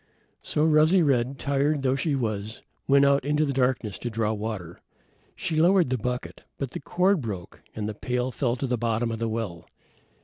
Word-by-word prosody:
So 150 - 0
Rosy 160 +3 +5
red, 135 -2 +1
tired 140 +1 0
though 130 0 +2
she 140 +2 0
was, 110 -4 -3 0.2
went 140 0 +5
out 140 -1 +3
in 145 +2 0
the 155 +1 +3
darkness 125 -5 0
to 120 - -3
draw 110 -1 0
water. 105 -6 -5 0.5
She 160 -2 0
lowered 175 -5 +4
the 130 - +1
bucket, 125 +2 -4
but 135 -3 -4
the - - -5
cord 180 +3 +1
broke 100 -7 -6
and 105 -1 -3
the 110 - -3
pail 125 +4 -2
fell 120 0 0
to 130 - -3
the 125 -2 -1
bottom 115 0 0
of 110 - -4
the 115 -1 -1
well. 110 -7 -4
125 Hz, 195 wpm, -26 LUFS, 110-140 Hz, 0.5 s, Rosy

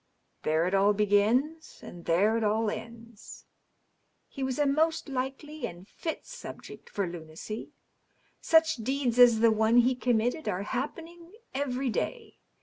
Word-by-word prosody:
There 160 +2 +1
it 185 - -1
all 200 +1 +4
b^ins, 220 +10 +1
and 175 -1 -10
there 200 +7 +3
it 230 - 0
all 215 +1 +1
ends. 230 0 -10 0.8
He 275 - -9
was 265 -1 -1
a 295 - +2
most 320 +4 +1
likely 275 +3 -4
and 175 +2 -12
fit 320 +7 -5
subject - - -10
for 200 - -2
lunacy. 170 +5 -7 0.7
Such 320 -2 +3
deeds 250 +1 -1
as 235 -3 +7
the 230 -1 +6
one 220 +2 +3
he 245 +2 +5
committed 245 +4 0
are 180 +2 -2
happening 330 - -6 0.2
every 265 -2 -1
day. 460 - -4
235 Hz, 145 wpm, -28 LUFS, 210-280 Hz, 0.8 s, as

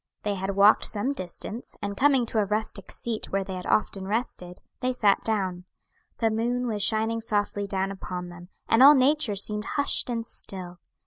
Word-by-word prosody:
They 205 - 0
had 195 0 -3
walked 200 +2 +6
some 225 +7 0
distance, 210 +2 -8
and 200 0 -4
coming 265 +1 +3
to 225 -1 -1
a 210 - +2
rustic 210 -1 -3
seat 230 -2 -4
where 195 0 0
they 190 - -7
had 180 0 -6
often 195 -2 0
rested, 195 -5 -3 0.2
they 255 0 0
sat 210 -5 +2
down. 185 -5 -2 0.5
The 225 -1 +1
moon 240 +3 -1
was 215 -4 -2
shining 220 +2 +2
softly 205 -2 -1
down 195 0 -1
upon 180 -2 -6
them, 175 0 -12 0.2
and 225 - +4
all 285 +3 +10
nature 270 -4 +2
seemed 210 +2 -2
hushed 285 -2 +2
and 230 -1 -2
still. 180 -5 -9
210 Hz, 185 wpm, -26 LUFS, 195-230 Hz, 0.5 s, all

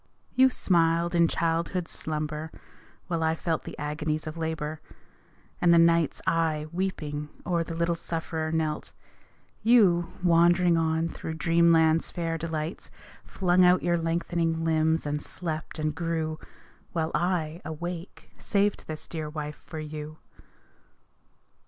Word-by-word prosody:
You 260 +1 +6
smiled 170 -5 +2
in 170 -1 +5
childhood's 165 +2 -1
slumber 155 0 -4 0.5
while 170 -3 -2
I 160 0 +2
felt 165 -1 -2
The - - -8
agonies 150 +1 -2
of 155 0 -5
labour; 160 -2 -3 0.8
and 175 - +5
the 170 - +7
nights 165 -2 +3
I, 160 -2 +1
weeping, 155 -5 -3 0.2
o'er 170 -2 +1
the 165 0 -6
little 170 +1 +1
sufferer 165 -1 -3
knelt, 155 -1 -2 0.7
You, 190 -7 +4
wandering 175 0 +5
on 160 0 +1
through 160 0 -6
dreamland's 165 0 +4
fair 165 -2 -3
delights 160 +1 -4 0.4
Flung 180 -1 +2
out 180 0 +5
your 175 0 +2
lengthening 165 0 0
limbs 160 0 +2
and 150 0 -2
slept 160 -1 -5
and 155 -1 -1
grew; 160 -1 -2 0.5
While 160 -2 -1
I, 170 -1 0
awake, 170 +3 -6
saved 205 0 0
this 155 -1 -6
dear 155 -2 -4
wife 150 -1 -5
for 160 - -10
you. 155 0 -7
165 Hz, 130 wpm, -27 LUFS, 155-170 Hz, 0.8 s, the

